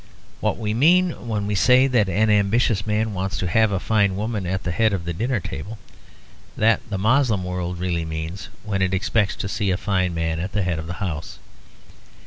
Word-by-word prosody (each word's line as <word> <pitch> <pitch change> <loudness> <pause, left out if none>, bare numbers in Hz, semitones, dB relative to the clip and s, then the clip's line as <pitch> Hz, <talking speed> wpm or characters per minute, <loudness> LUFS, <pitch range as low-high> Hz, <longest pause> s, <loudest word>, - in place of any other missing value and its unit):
What - - 0
we 105 -2 -2
mean 175 +9 +4 0.2
when 105 -3 -1
we 105 - -2
say 125 +7 +5
that 120 -7 +2
an 105 +4 +2
ambitious 105 0 +2
man 105 +1 0
wants 95 +2 -3
to - - -2
have 110 +4 +3
a 95 - 0
fine 100 -2 +1
woman 105 -2 -3
at 95 +1 -2
the 85 - -2
head 110 +4 +2
of 90 -3 -3
the 85 - -2
dinner 120 +6 -1
table, 95 +6 -7 0.8
that 115 +1 +3
the 100 - -2
Moslem 110 -1 +2
world 90 -1 -3
really 85 -2 -1
means 80 +3 -5
when 100 -2 -2
it 95 0 +1
expects 100 -2 0
to - - -4
see 100 0 -1
a 90 - +1
fine 95 -4 0
man 80 0 -1
at 95 +4 -4
the 100 - 0
head 85 -3 -1
of 80 - -7
the 85 - -4
house. 75 -4 -5
100 Hz, 210 wpm, -22 LUFS, 90-110 Hz, 0.8 s, say